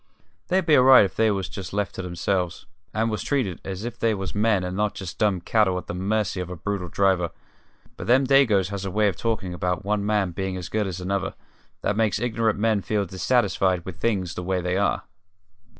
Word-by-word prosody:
They'd 190 +1 +1
be 155 - +5
all 130 - +6
right 130 -5 +8
if 95 - -6
they 110 0 +3
was 95 -2 -4
left 100 -2 -1
to - - -5
their 90 -1 -6
selves, 90 0 -1 0.3
and 110 +1 0
was 105 -3 -2
treated 125 - -1
as 95 +3 -5
if 120 - -6
they 115 -2 +2
was 95 -4 -5
men 105 -2 +2
and 90 0 -4
not 105 +1 0
just 95 -3 -7
dumb 100 -5 +2
cattle 95 -1 +2
at 90 - -5
the - - -5
mercy 100 +1 -1
of 90 -1 -4
a 90 - -5
brutal 100 +1 -3
driver; 95 -3 +2 0.7
but - - -7
them 130 +3 +5
Dagoes 125 -9 +4
has 100 -1 -4
a 95 - -3
way 105 +3 +2
of 95 - -4
talkin' 110 -4 -2
about 90 0 -2
one 105 0 0
man 105 -3 +1
being 95 +1 -3
as 90 -2 -6
good 105 -2 0
as 90 -1 -5
another 100 +1 -2 0.5
that 100 - +1
makes 110 -1 +1
ignorant 115 -2 0
men 110 -1 +2
feel 100 +2 -1
dissatisfied 95 -2 +1
with 95 -3 -7
things 95 -6 -1
the 90 - -5
way 90 +1 -1
they 90 +1 -1
are." 100 +1 +1
100 Hz, 225 wpm, -24 LUFS, 90-110 Hz, 0.7 s, right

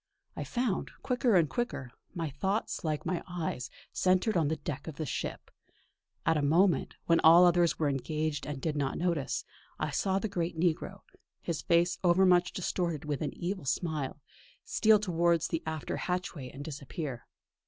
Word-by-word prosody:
I - - -3
found, 240 -6 -1
quicker 245 -3 +2
and 170 -4 +5
quicker, 145 - -3 0.2
my 165 -4 -2
thoughts 190 +10 -2
like 155 -2 -2
my 180 -2 -1
eyes, 160 -8 -3 0.2
centred 185 +4 +2
on 165 -4 +3
the 160 - 0
deck 150 -3 -6
of 160 - -6
the 155 - -3
ship. - - -4 0.7
At 165 0 +3
a - - +1
moment, 165 +2 +3
when 165 -1 +4
all 170 +3 +8
others 175 -1 +4
were 155 - +1
engaged 150 +2 -2
and 145 -2 -4
did 150 +2 -2
not 140 -2 -1
notice 170 -5 -1
him, - - -40 0.3
I - - -2
saw 190 -1 +1
the 205 - -1
great 170 -4 -3
negro, 170 -2 0 0.4
his 165 -3 -3
face 170 +1 +2
over 180 +2 +5
much 180 -1 +4
distorted 170 -4 -2
with 150 0 -2
an 155 - -3
evil 185 -1 -3
smile, 150 -1 -2 0.5
steal 220 0 +5
towards 170 -4 +1
the 165 - -1
after 160 -2 -3
hatchway 180 -7 -3
and 140 +2 -8
disappear. 140 -3 -6
165 Hz, 175 wpm, -30 LUFS, 150-180 Hz, 0.7 s, all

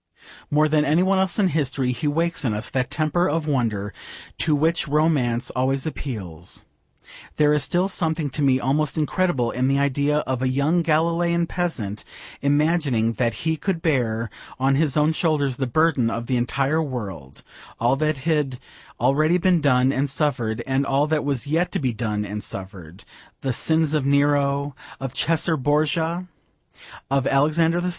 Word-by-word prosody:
More 150 +1 +3
than 150 0 +2
any 155 +5 +3
one 190 0 +2
else 190 -2 +1
in 200 -3 +3
history 140 -5 0
he 125 +5 -3
wakes 165 +2 0
in 115 -5 0
us 120 +4 -3
that 125 -1 -1
temper 155 +5 0
of 155 +1 -1
wonder 110 -8 -1 0.5
to 155 -2 +3
which 160 +3 +1
romance 140 -6 +1
always 130 +1 0
appeals. 95 - -6 0.7
There 150 -1 +3
is 150 - +2
still 175 +6 +1
something 160 -6 -1
to 150 - -4
me 135 -2 +3
almost 140 +4 0
incredible 155 -5 0
in 130 +1 0
the 135 +1 +2
idea 140 +1 +1
of 130 -1 -2
a 130 - +1
young 145 +6 +1
Galilean 170 +1 +1
peasant 130 - -3 0.4
imagining 145 -5 +1
that 115 -1 0
he 160 0 +1
could 170 -1 -2
bear 115 -8 0 0.3
on 135 +1 +2
his 145 -1 +1
own 150 +1 +3
shoulders 145 -6 0
the 130 - -1
burden 145 -3 +2
of 115 +1 -4
the 130 - -1
entire 135 +5 0
world; 105 - -6 0.4
all 120 +3 +2
that 155 0 0
had 145 -3 -1 0.4
already 155 +8 +3
been 180 -2 +2
done 130 -2 +3
and 140 +1 -1
suffered, 130 -6 -1
and 135 +1 0
all 140 +1 +1
that 155 0 0
was 140 -4 -2
yet 165 +5 0
to - - +1
be 130 -4 -1
done 105 -2 -2
and 105 0 -5
suffered: 95 -3 -7 0.4
the 135 -2 -1
sins 160 +4 +1
of 150 -3 +1
Nero, 140 0 +1 0.2
of 135 -1 -5
Caesar 165 0 +2
Borgia, 160 +5 0 0.8
of 135 -1 +1
Alexander 160 +4 +2
VI. 180 - -1
140 Hz, 170 wpm, -23 LUFS, 125-160 Hz, 0.8 s, More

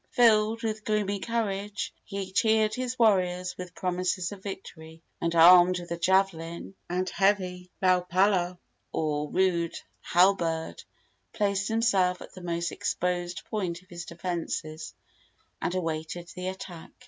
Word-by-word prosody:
Filled 225 -1 +4
with 215 -1 -2
gloomy 205 -2 0
courage, 205 -3 -2
he 195 -2 -5
cheered 220 +1 +3
his 255 +1 -3
warriors 185 -5 +2
with 180 -1 -8
promises 180 -1 -1
of 200 -2 -9
victory, 165 -5 -9 0.2
and, 170 0 0
armed 180 +2 +8
with 175 -1 -10
a - - 0
javelin 170 -1 0 0.2
and 180 +1 -1
heavy 185 -2 0
laau 185 -1 +4
palau, 180 -1 +2 0.3
or 150 -1 -1
rude 175 -3 +1 0.2
halberd, 170 -3 +2 0.5
placed 200 -1 0
himself 200 -6 +2
at - - -11
the 185 - -10
most 170 0 -2
exposed 180 0 -2
point 185 -5 -3
of 185 - -29
his 175 0 -7
defences 170 -2 -4 0.7
and 175 - -1
awaited 165 0 -3
the 180 0 -6
attack. 185 -3 -7
185 Hz, 135 wpm, -28 LUFS, 175-200 Hz, 0.7 s, armed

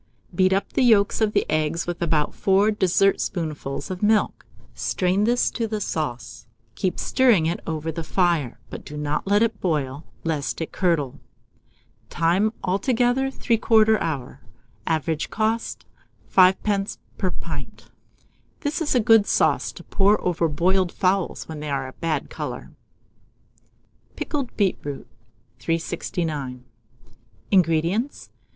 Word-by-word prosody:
Beat 185 +2 +3
up 195 +1 0
the - - +1
yolks 220 -4 +4
of 215 -1 +2
the - - +2
eggs 155 +2 0
with 175 -1 -4
about 155 -3 +1
4 195 +2 +3
dessertspoonfuls 175 -7 0
of 185 - -5
milk; 215 0 +1 0.3
strain 185 +3 0
this 240 +2 +2
to 230 -2 -2
the 215 -1 -3
sauce, 150 -11 -4 0.3
keep 185 - -2
stirring 240 -11 +3
it 165 +2 -1
over 160 0 -2
the 165 +1 -5
fire, 165 -7 0
but - - -7
do 150 - -8
not 150 +4 -2
let 205 +2 +4
it 225 -2 -1
boil, 145 -4 -1 0.2
lest 155 -4 -2
it 160 - -4
curdle. 165 -8 0 0.9
Time. 175 +6 +2
Altogether, 245 +7 +1
3/4 220 -3 +3
hour. 135 -4 -4 0.5
Average 160 -1 -1
cost, 225 +1 -2 0.5
5d. 195 +2 +3 0.2
per 185 - +1
pint. - - -8 0.7
This 295 +2 -2
is 295 -4 +1
a - - +5
good 225 -2 +5
sauce - - +2
to - - -12
pour 205 +1 +2
over 170 -2 +1
boiled 180 +4 +1
fowls 185 0 0
when 160 -2 -7
they 150 0 -5
are 135 -2 -2
a 130 - -10
bad 165 -2 -2
colour. - - -6 1.4
PICKLED 280 -5 -4
BEETROOT. 180 -8 -1 0.5
369. 160 -5 -3 0.9
INGREDIENTS. 180 - +1
180 Hz, 130 wpm, -23 LUFS, 155-210 Hz, 1.4 s, a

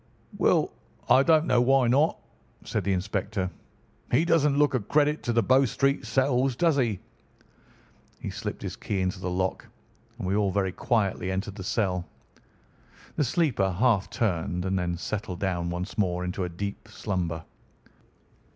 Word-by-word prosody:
"Well, - - +3 0.4
I 130 - +7
don't 155 +2 +4
know 125 -5 +3
why 130 0 +4
not," 140 +7 +3 0.5
said - - -2
the 100 - +1
inspector. 95 0 -2 0.6
"He 145 +7 +3
doesn't 150 -4 +3
look 145 -1 +3
a 130 - +2
credit 150 +7 +1
to 120 - -1
the 115 -1 +2
Bow 130 +1 +4
Street 135 +2 0
cells, 130 +1 +2
does 165 +2 +3
he?" 115 -8 +1 1.2
He - - -5
slipped - - -5
his - - -4
key 100 - -3
into 95 0 -1
the 90 - -3
lock, 95 +1 -2 0.5
and 115 - -5
we 95 - +1
all 105 -1 +2
very 95 0 0
quietly 100 -3 0
entered 95 +2 -3
the 95 -1 -8
cell. 90 -3 -1 1.1
The - - +2
sleeper 125 - +1
half 105 0 +2
turned, 90 -4 -1
and 95 0 0
then 90 -1 -2
settled 100 -1 -4
down 90 -3 -1
once 90 +3 -4
more 90 -3 +1
into 90 +1 -3
a - - -4
deep 100 +5 -6
slumber. 90 -7 -3
100 Hz, 160 wpm, -27 LUFS, 95-130 Hz, 1.2 s, I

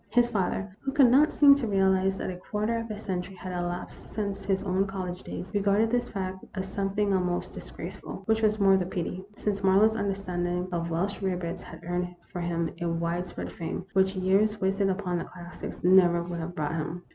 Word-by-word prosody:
His 240 0 +4
father, 195 -2 -1
who 270 - -3
could 270 -5 +6
not 295 +5 +6
seem 285 -1 +8
to 280 -4 0
realize 190 -1 +3
that - - -3
a - - -6
quarter 210 +5 -2
of 230 0 -6
a 215 - -4
century 190 -2 -4
had 185 0 -7
elapsed 175 0 -4
since 200 -2 -3
his 195 -1 0
own 190 0 +1
college 185 -2 -4
days, 185 - -7
regarded 205 +2 +3
this 245 0 +1
fact 190 -1 -4
as 190 -1 -3
some 195 0 -2
thing 205 -2 +2
almost 180 -2 0
disgraceful, - - -8
which 220 -1 +2
was 215 0 +2
more 195 -1 +6
the 185 - 0
pity, 185 0 -3
since 200 -1 -1
Marlowe's 200 +3 +5
understanding 180 -3 -1
of 170 -1 -2
Welsh 185 +6 -1
rarebits 180 -2 -2
had - - -11
earned 180 0 -2 0.2
for 175 - -4
him 170 -1 -1
a 170 - 0
wide 170 +2 -1
spread - - -6
fame, 170 +2 -4
which 190 0 +3
years 195 +3 +2
wasted 195 +1 +1
upon 185 -2 -1
the - - -3
classics 175 -1 -9
never 175 -1 +6
would 170 0 -5
have 170 +2 -5
brought 150 0 -1
him. 165 +2 -3
190 Hz, 205 wpm, -28 LUFS, 180-205 Hz, 0.2 s, seem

